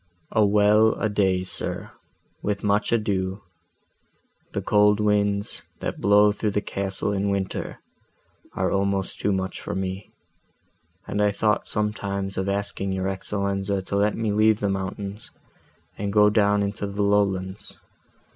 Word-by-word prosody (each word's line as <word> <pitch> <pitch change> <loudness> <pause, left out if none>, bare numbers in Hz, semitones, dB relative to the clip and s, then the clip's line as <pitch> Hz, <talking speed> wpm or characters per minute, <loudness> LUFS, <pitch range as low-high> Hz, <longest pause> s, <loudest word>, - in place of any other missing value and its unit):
"A 110 - +3
well 105 +2 +4
a 110 - -1
day, 95 -3 +1
sir, 95 - -2 0.5
with 100 -1 -2
much 105 0 +1
ado; 100 -3 -1 1.1
the - - -2
cold 105 0 +4
winds, 100 -1 0 0.2
that - - -4
blow 105 +1 +5
through 105 +1 -1
the 105 - 0
castle 100 -1 -3
in 100 0 0
winter, 100 -1 -3 0.8
are - - 0
almost 100 0 -1
too 105 - +1
much 95 -1 -2
for - - -4
me; 95 +1 -4 1.0
and 105 - -2
I 105 - +4
thought 105 +1 0
sometimes 100 -2 -2
of 95 +1 -1
asking 100 -1 -2
your 95 0 -1
Excellenza 100 0 -2
to 100 - -4
let 105 +1 +2
me 110 -2 0
leave 110 +1 +3
the 100 - 0
mountains, 100 +2 -4 0.7
and 100 0 -2
go 105 0 +5
down 105 -1 +3
into 100 0 -3
the 100 +1 -2
lowlands. 100 -1 0
100 Hz, 145 wpm, -24 LUFS, 95-105 Hz, 1.1 s, blow